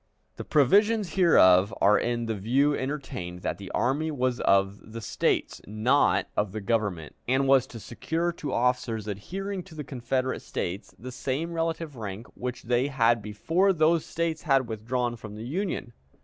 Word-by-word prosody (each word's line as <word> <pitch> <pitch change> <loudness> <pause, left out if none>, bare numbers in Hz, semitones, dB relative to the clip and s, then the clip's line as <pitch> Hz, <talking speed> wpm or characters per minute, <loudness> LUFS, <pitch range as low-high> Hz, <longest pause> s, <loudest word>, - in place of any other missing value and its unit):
The - - -5
provisions 205 - +3
hereof 100 - +5
are 105 +2 +5
in 120 0 -1
the 115 - -1
view 130 +8 +2
entertained 130 -11 -5
that - - -2
the 100 -2 -8
army 145 +6 0
was 130 -4 -1
of 100 +2 +1
the 115 - -5
States, 110 - -1
not 110 +7 +2
of 105 -2 0
the 110 - -3
Government, 100 -7 -1
and 135 +2 +2
was 135 -1 +4
to 115 - -9
secure 160 - -2
to 160 -3 -6
officers 120 -3 0
adhering 190 - -4
to 175 -2 -14
the 150 - -5
Confederate 130 0 -2
States 95 +4 -5
the 130 +3 -8
same 140 +6 -3
relative 165 -2 -2
rank 105 -1 -6
which 125 0 -5
they 120 +3 +1
had 120 -4 +2
before 165 - +1
those 160 0 +3
States 165 -1 -2
had 135 -5 +2
withdrawn 120 +2 -2
from 105 -2 -9
the 110 +2 -7
Union. 165 -4 -3
125 Hz, 165 wpm, -27 LUFS, 110-155 Hz, -, hereof